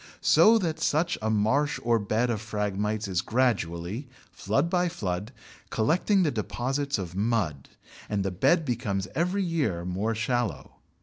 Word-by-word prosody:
So 225 +1 +6
that 170 -7 -2
such 170 +4 +1
a 110 - -1
marsh 130 +8 +1
or 115 -1 +3
bed 110 +4 0
of 110 -3 -2
Phragmites 105 -1 -2
is 90 -3 0
gradually, 110 - -1 0.2
flood 140 +4 0
by 180 0 +1
flood, 100 - -4 0.4
collecting 180 - +2
the 155 - +1
deposits 135 +5 -2
of 90 -4 -5
mud, 95 - -1 0.4
and 100 -2 -1
the 95 - -1
bed 160 - +2
becomes 110 -7 -2
every 180 +4 0
year 140 - -1
more 100 +5 -1
shallow. 120 -1 -2
115 Hz, 145 wpm, -27 LUFS, 100-145 Hz, 0.4 s, So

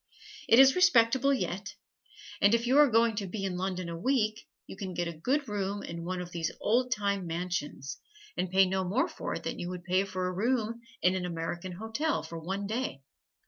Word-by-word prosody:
It 230 - +7
is 265 0 +8
respectable 275 -7 +4
yet, 205 -6 -2 0.7
and 205 +3 +6
if 235 +1 -1
you 255 +3 +2
are 295 -2 +7
going 230 -1 +3
to 200 -2 -2
be 195 +1 -4
in 185 -2 -2
London 185 -1 -2
a 170 - -4
week 215 +2 0 0.2
you - - -9
can 190 -2 -6
get 175 0 -1
a 170 - -4
good 265 - -1
room 205 -1 -2
in 170 0 -6
one 180 +1 -3
of 180 0 -8
these 165 -2 -2
old 250 +4 +1
time 200 -3 0
mansions, 165 -5 -4 0.4
and 185 - -1
pay 190 +1 +5
no 190 0 0
more 235 - +1
for - - -5
it - - -6
than - - -4
you 175 - -4
would 180 -1 -6
pay 185 +1 +2
for 185 -1 -3
a 185 - -2
room 230 +3 0 0.2
in 180 - +5
an 185 -1 -2
American 170 +2 -4
hotel 225 - -2
for 165 +1 -7
one 190 +5 -3
day. 220 - -3
195 Hz, 215 wpm, -30 LUFS, 180-230 Hz, 0.7 s, is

